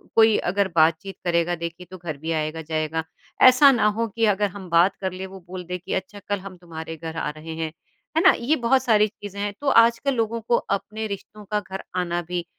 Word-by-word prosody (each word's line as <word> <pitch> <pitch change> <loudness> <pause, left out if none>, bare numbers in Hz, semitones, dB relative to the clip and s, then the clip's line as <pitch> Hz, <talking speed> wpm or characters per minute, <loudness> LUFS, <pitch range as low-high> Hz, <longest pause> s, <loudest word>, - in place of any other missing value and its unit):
कोई 220 -1 +6
अगर 200 0 +1
बातचीत 160 +4 +2
करेगा। 175 0 +1
देखिए, 170 +2 -6
तो 185 - -8
घर 160 -4 -6
भी 160 +3 -4
आएगा-जाएगा 155 0 -2 0.4
ऐसा 275 +2 +8
ना 225 -4 +3
हो 230 0 +1
कि 225 +2 0
अगर 205 +1 0
हम 185 -1 -10
बात 170 +4 +4
कर 190 -1 -1
लें 185 +1 -6
वो 190 0 -11
बोल 180 0 -6
दे 180 +1 -4
कि 180 - -6
अच्छा 190 +2 -4
कल 205 -1 0
हम 185 -1 -10
तुम्हारे 165 -2 -8
घर 160 0 -7
आ 150 - -1
रहे 155 +2 -8
हैं। 160 -1 -3 0.5
है - - +5
ना? 375 - +9
ये 275 +7 +2
बहुत 260 +1 +2
सारी 215 -3 +4
चीजें 200 -1 -10
हैं 205 0 -2
तो 290 - -4
आजकल 235 +4 +4
लोगों 230 0 -1
को 235 +2 +1
अपने 215 +2 -3
रिश्तों 205 +1 -8
का 210 - +2
घर 190 -1 -7
आना 175 -1 -1
भी 175 0 -4
190 Hz, 225 wpm, -24 LUFS, 165-215 Hz, 0.5 s, ना